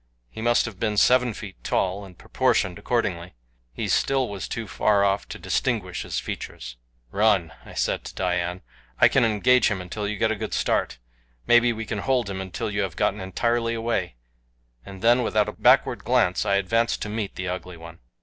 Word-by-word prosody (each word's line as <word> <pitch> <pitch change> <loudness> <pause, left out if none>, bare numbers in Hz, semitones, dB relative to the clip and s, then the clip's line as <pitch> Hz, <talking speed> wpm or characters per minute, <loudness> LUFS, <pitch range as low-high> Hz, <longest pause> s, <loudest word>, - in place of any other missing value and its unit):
He 110 - -8
must 120 +1 +3
have 105 -5 -8
been 105 -2 -1
seven 125 +2 +4
feet 100 -2 -10
tall, 95 +2 -1
and 90 -3 -15
proportioned 110 -9 0
accordingly. 90 - -2 0.4
He - - -4
still 135 -2 +1
was 100 -2 -5
too 115 -2 -5
far 100 +3 +2
off 100 0 0
to - - -6
distinguish 105 -9 -1
his - - -3
features. 60 0 -7 0.4
"Run," 100 -6 +2 0.2
I - - -11
said - - -1
to - - -8
Dian. 90 -1 -1 0.4
"I - - +8
can 135 - +3
engage 115 +3 +3
him 105 -3 -2
until 100 +3 -5
you 105 0 -3
get 110 +2 +1
a - - 0
good 110 0 -4
start. - - 0 0.5
Maybe 120 0 +5
I 115 -1 -4
can 105 - -4
hold 125 -3 0
him 95 -1 -4
until 95 +2 -4
you 100 0 -1
have 95 -4 -3
gotten 105 - 0
entirely 115 +5 0
away," 115 - -2 0.7
and 95 - -11
then, 120 +2 +5
without 110 -3 +1
a - - -3
backward - - +3
glance, 90 +4 +2
I 100 - +3
advanced 115 +4 +1
to 105 - -5
meet 105 -1 -4
the 95 - -4
Ugly 90 -1 -5
One. 85 0 -12
105 Hz, 195 wpm, -24 LUFS, 95-115 Hz, 0.7 s, I